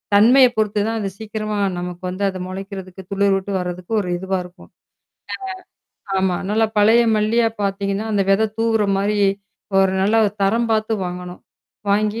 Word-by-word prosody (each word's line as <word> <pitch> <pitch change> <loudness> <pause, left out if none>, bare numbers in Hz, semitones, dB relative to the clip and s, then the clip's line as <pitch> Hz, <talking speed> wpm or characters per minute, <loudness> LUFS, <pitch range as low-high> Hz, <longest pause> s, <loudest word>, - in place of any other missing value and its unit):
தன்மையை 250 +5 +7
பொறுத்து 210 -1 +1
தான் 225 - -1
அது 200 -2 -2
சீக்கிரமா 215 -1 -4 0.2
நமக்கு 180 +1 -6
வந்து 185 +2 -4
அது 185 -1 -6
முளைக்கிறதுக்கு 190 0 -7
துளிர்விட்டு 200 0 +1
வர்றதுக்கு 180 +3 -5
ஒரு 180 - -5
இதுவா 190 +1 -2
இருக்கும். 180 +2 -15 1.4
ஆ - - -2
ஆமா. 185 -2 +1
நல்ல 220 +1 +3
பழைய 220 +3 +5 0.2
மல்லியா 225 +2 +2
பாத்தீங்கன்னா 200 +2 -1
அந்த 200 - +2
விதை 215 +3 +4
தூவுற 225 -1 +2 0.2
மாரி 205 +1 0 0.6
ஒரு 190 -1 +4
நல்ல 215 +3 +3 0.2
தரம் 230 +4 +2
பாத்து 220 0 +1
வாங்கணும். 180 0 -7 0.5
வாங்கி 210 +2 +1
200 Hz, 150 wpm, -20 LUFS, 190-220 Hz, 1.4 s, தன்மையை